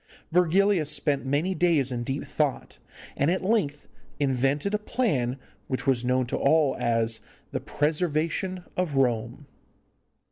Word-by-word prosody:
Virgilius 180 Hz, -1 st, +3 dB
spent 145 Hz, -2 st, 0 dB
many 150 Hz, +8 st, +1 dB
days 165 Hz, -8 st, +2 dB
in 120 Hz, -1 st, -2 dB
deep 135 Hz, +4 st, -3 dB
thought, 145 Hz, -1 st, -2 dB, 0.4 s
and 140 Hz, -, +1 dB
at 185 Hz, +2 st, 0 dB
length 185 Hz, -9 st, 0 dB, 0.3 s
invented 140 Hz, +6 st, +1 dB
a 210 Hz, -, +1 dB
plan 145 Hz, -, 0 dB, 0.3 s
which 130 Hz, -1 st, -3 dB
was 130 Hz, -3 st, +2 dB
known 125 Hz, +1 st, +1 dB
to 120 Hz, -, -2 dB
all 150 Hz, 0 st, +3 dB
as 115 Hz, -1 st, +2 dB, 0.3 s
the -, -, -2 dB
'Preservation 165 Hz, +4 st, -1 dB
of 180 Hz, -6 st, -1 dB
Rome. 120 Hz, +1 st, 0 dB
145 Hz, 135 wpm, -26 LUFS, 130-175 Hz, 0.4 s, Virgilius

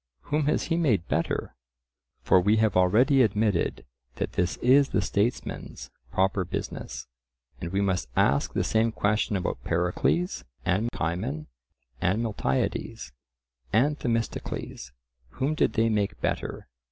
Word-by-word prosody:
Whom 150 Hz, -1 st, +2 dB
has -, -, +2 dB
he 165 Hz, -, 0 dB
made 115 Hz, -, +2 dB
better? 85 Hz, -, -1 dB, 0.7 s
For 95 Hz, -, +5 dB
we 105 Hz, +4 st, +3 dB
have 110 Hz, -3 st, +2 dB
already 120 Hz, +10 st, +4 dB
admitted 105 Hz, -, +1 dB, 0.3 s
that -, -, -3 dB
this 90 Hz, 0 st, -1 dB
is 135 Hz, +3 st, +4 dB
the 105 Hz, -, +1 dB
statesman's 105 Hz, +6 st, -2 dB, 0.2 s
proper 95 Hz, 0 st, +1 dB
business. 90 Hz, -, -5 dB, 0.5 s
And 85 Hz, -, -5 dB
we 95 Hz, +1 st, +1 dB
must 90 Hz, -10 st, 0 dB
ask 70 Hz, 0 st, +2 dB
the -, -, +1 dB
same 110 Hz, +1 st, +2 dB
question 105 Hz, -1 st, 0 dB
about 95 Hz, -, -2 dB
Pericles, 90 Hz, -, 0 dB, 0.2 s
and 95 Hz, +6 st, +1 dB
Cimon, 75 Hz, -2 st, -3 dB, 0.6 s
and 95 Hz, +6 st, +1 dB
Miltiades, 65 Hz, -, -2 dB, 0.6 s
and 145 Hz, +7 st, +2 dB
Themistocles. 115 Hz, -, -3 dB, 0.4 s
Whom 135 Hz, -, 0 dB
did 155 Hz, -, +1 dB
they 115 Hz, 0 st, +2 dB
make 105 Hz, -3 st, 0 dB
better? -, -, -3 dB
105 Hz, 130 wpm, -27 LUFS, 90-120 Hz, 0.7 s, For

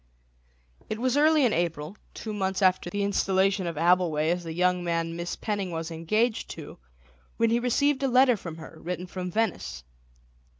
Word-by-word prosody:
It 215 Hz, -, -2 dB
was 255 Hz, +2 st, 0 dB
early 305 Hz, -1 st, +5 dB
in 225 Hz, -, +2 dB
April, 165 Hz, 0 st, -2 dB, 0.2 s
two 220 Hz, -, -5 dB
months 190 Hz, -1 st, -1 dB
after 185 Hz, -1 st, +3 dB
the 205 Hz, +3 st, -2 dB
installation 195 Hz, -1 st, +1 dB
of 170 Hz, -, -3 dB
Abbleway 165 Hz, -1 st, +2 dB
as 175 Hz, 0 st, -5 dB
the 165 Hz, -, -6 dB
young 180 Hz, 0 st, +2 dB
man 165 Hz, -1 st, -1 dB
Miss 170 Hz, +1 st, -4 dB
Penning 205 Hz, -3 st, -3 dB
was 165 Hz, -1 st, -4 dB
engaged 215 Hz, +9 st, 0 dB
to, -, -, -10 dB, 0.6 s
when 230 Hz, 0 st, +2 dB
he 235 Hz, -, +3 dB
received 265 Hz, +3 st, +1 dB
a 275 Hz, -, +2 dB
letter 255 Hz, 0 st, +5 dB
from 170 Hz, -5 st, -7 dB
her, 160 Hz, 0 st, -11 dB
written 180 Hz, +1 st, -4 dB
from 180 Hz, 0 st, -5 dB
Venice. 220 Hz, -, -2 dB
185 Hz, 175 wpm, -27 LUFS, 170-225 Hz, 0.6 s, early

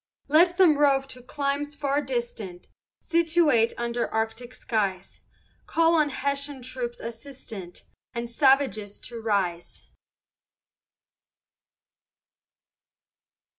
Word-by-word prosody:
Let 345 Hz, +4 st, +5 dB
them 330 Hz, -6 st, +5 dB
rove 275 Hz, -2 st, +3 dB
to 255 Hz, -, -8 dB
climes 285 Hz, +3 st, -2 dB
far 285 Hz, 0 st, 0 dB
distant, 235 Hz, -9 st, -5 dB, 0.3 s
Situate 325 Hz, -8 st, +3 dB
under 235 Hz, 0 st, -2 dB
Arctic 225 Hz, +2 st, -2 dB
skies, 195 Hz, -5 st, -2 dB, 0.5 s
Call 330 Hz, 0 st, +3 dB
on 305 Hz, -3 st, +3 dB
Hessian 280 Hz, 0 st, -3 dB
troops 245 Hz, -1 st, -5 dB
assistant, 230 Hz, -6 st, -9 dB, 0.3 s
And 235 Hz, -1 st, -4 dB
the 235 Hz, -, -14 dB
savages 265 Hz, -6 st, +2 dB
to 235 Hz, -1 st, -7 dB
rise. 190 Hz, -6 st, -2 dB
255 Hz, 95 wpm, -26 LUFS, 225-290 Hz, 0.5 s, Let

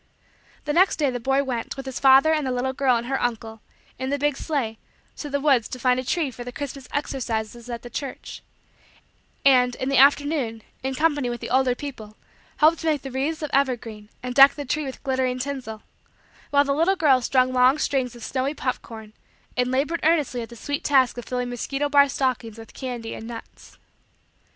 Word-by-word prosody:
The 295 Hz, -, -1 dB
next 370 Hz, +4 st, +4 dB
day 290 Hz, -4 st, +1 dB
the 245 Hz, -, -4 dB
boy 270 Hz, +3 st, +1 dB
went, 250 Hz, -1 st, -4 dB
with 270 Hz, -, -6 dB
his 265 Hz, -1 st, -5 dB
father 270 Hz, +4 st, +6 dB
and 305 Hz, -3 st, 0 dB
the -, -, -1 dB
little 250 Hz, +1 st, -1 dB
girl 265 Hz, -2 st, +2 dB
and 235 Hz, -, -4 dB
her 270 Hz, +2 st, -2 dB
uncle, 225 Hz, -2 st, -3 dB, 0.4 s
in 260 Hz, -, -3 dB
the 285 Hz, -, 0 dB
big 290 Hz, 0 st, 0 dB
sleigh, 260 Hz, -8 st, -3 dB, 0.4 s
to 295 Hz, -, -6 dB
the 285 Hz, 0 st, -1 dB
woods 270 Hz, -6 st, +3 dB
to -, -, -5 dB
find 250 Hz, 0 st, +2 dB
a -, -, -3 dB
tree 300 Hz, +1 st, -1 dB
for 245 Hz, 0 st, -8 dB
the 245 Hz, -, -7 dB
Christmas 275 Hz, 0 st, -7 dB
"exercises" 240 Hz, -4 st, -3 dB
at 235 Hz, -1 st, -5 dB
the 240 Hz, -, -8 dB
church; 265 Hz, +3 st, -6 dB, 1.0 s
and, 250 Hz, -2 st, +5 dB
in 260 Hz, -, -3 dB
the 275 Hz, -2 st, +3 dB
afternoon, 275 Hz, -5 st, +3 dB, 0.2 s
in 265 Hz, 0 st, -3 dB
company 290 Hz, -3 st, +1 dB
with 240 Hz, 0 st, -4 dB
the -, -, -7 dB
older 260 Hz, -1 st, +3 dB
people, 225 Hz, -7 st, -8 dB, 0.4 s
helped 315 Hz, +2 st, +4 dB
to 325 Hz, -, -4 dB
make 300 Hz, -3 st, +1 dB
the 270 Hz, -, -6 dB
wreaths 300 Hz, +5 st, -2 dB
of 300 Hz, -, -4 dB
evergreen 230 Hz, -6 st, -1 dB
and 250 Hz, 0 st, -4 dB
deck 275 Hz, +1 st, +8 dB
the 290 Hz, -, -5 dB
tree 300 Hz, +3 st, -1 dB
with 265 Hz, -, -8 dB
glittering 260 Hz, -2 st, 0 dB
tinsel; 255 Hz, -5 st, -5 dB, 0.7 s
while 285 Hz, 0 st, +4 dB
the 280 Hz, -1 st, 0 dB
little 335 Hz, +7 st, +2 dB
girl 280 Hz, -8 st, +4 dB
strung 255 Hz, +1 st, +2 dB
long 255 Hz, +3 st, +5 dB
strings 260 Hz, -5 st, -1 dB
of 235 Hz, -, -11 dB
snowy 265 Hz, +4 st, -2 dB
pop 255 Hz, -3 st, -2 dB
corn 220 Hz, -2 st, -11 dB, 0.4 s
and 250 Hz, 0 st, +1 dB
labored 285 Hz, +6 st, 0 dB
earnestly 300 Hz, -6 st, +1 dB
at 230 Hz, -, -7 dB
the 240 Hz, -, -11 dB
sweet 285 Hz, +5 st, -4 dB
task 265 Hz, -3 st, +3 dB
of 245 Hz, -, -8 dB
filling 250 Hz, -1 st, -3 dB
mosquito 275 Hz, +4 st, -2 dB
bar 285 Hz, -1 st, +5 dB
stockings 250 Hz, -5 st, -2 dB
with 225 Hz, -1 st, -12 dB
candy 245 Hz, -4 st, -5 dB
and 225 Hz, -, -8 dB
nuts. 230 Hz, -1 st, -11 dB
260 Hz, 210 wpm, -24 LUFS, 245-285 Hz, 1.0 s, deck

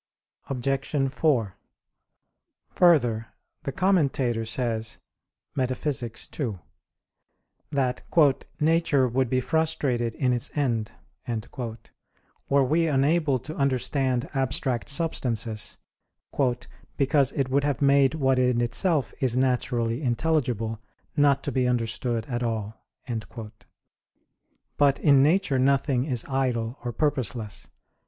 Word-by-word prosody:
Obj. 135 Hz, +1 st, -1 dB
4: 125 Hz, -, +1 dB, 1.2 s
Further, 120 Hz, -11 st, +3 dB, 0.3 s
the 140 Hz, -, -4 dB
Commentator 140 Hz, -11 st, +1 dB
says 110 Hz, -1 st, -1 dB, 0.6 s
(Metaph. 130 Hz, 0 st, -2 dB
ii) 115 Hz, -7 st, -1 dB, 1.2 s
that 130 Hz, -3 st, 0 dB, 0.6 s
"nature 155 Hz, -4 st, +3 dB
would 125 Hz, +1 st, 0 dB
be 130 Hz, -, +2 dB
frustrated 130 Hz, -6 st, 0 dB
in 125 Hz, -3 st, +1 dB
its 120 Hz, -, -1 dB
end" 120 Hz, -7 st, 0 dB, 1.6 s
were 140 Hz, 0 st, +4 dB
we 165 Hz, +5 st, +2 dB
unable 145 Hz, 0 st, +2 dB
to 135 Hz, +6 st, -7 dB
understand 135 Hz, -1 st, 0 dB
abstract 130 Hz, -2 st, 0 dB
substances, 125 Hz, -7 st, -1 dB, 1.2 s
"because 140 Hz, -1 st, +2 dB
it 135 Hz, -2 st, -1 dB
would 140 Hz, +1 st, +2 dB
have 145 Hz, -3 st, 0 dB
made 140 Hz, 0 st, +4 dB
what 135 Hz, -4 st, +2 dB
in 125 Hz, -1 st, +2 dB
itself 125 Hz, +6 st, 0 dB
is 125 Hz, -2 st, +1 dB
naturally 125 Hz, -1 st, 0 dB
intelligible 120 Hz, -5 st, 0 dB, 0.4 s
not 145 Hz, -2 st, +3 dB
to -, -, -2 dB
be 130 Hz, -1 st, +1 dB
understood 115 Hz, -1 st, -1 dB
at 120 Hz, -1 st, -3 dB
all." 110 Hz, -3 st, -2 dB, 2.0 s
But 140 Hz, -2 st, +4 dB
in 140 Hz, -3 st, +5 dB
nature 150 Hz, -2 st, +3 dB
nothing 135 Hz, -1 st, +2 dB
is 125 Hz, -6 st, -1 dB
idle 125 Hz, -3 st, -1 dB
or 120 Hz, -, -2 dB
purposeless. 120 Hz, -5 st, -2 dB
130 Hz, 105 wpm, -26 LUFS, 120-140 Hz, 2.0 s, in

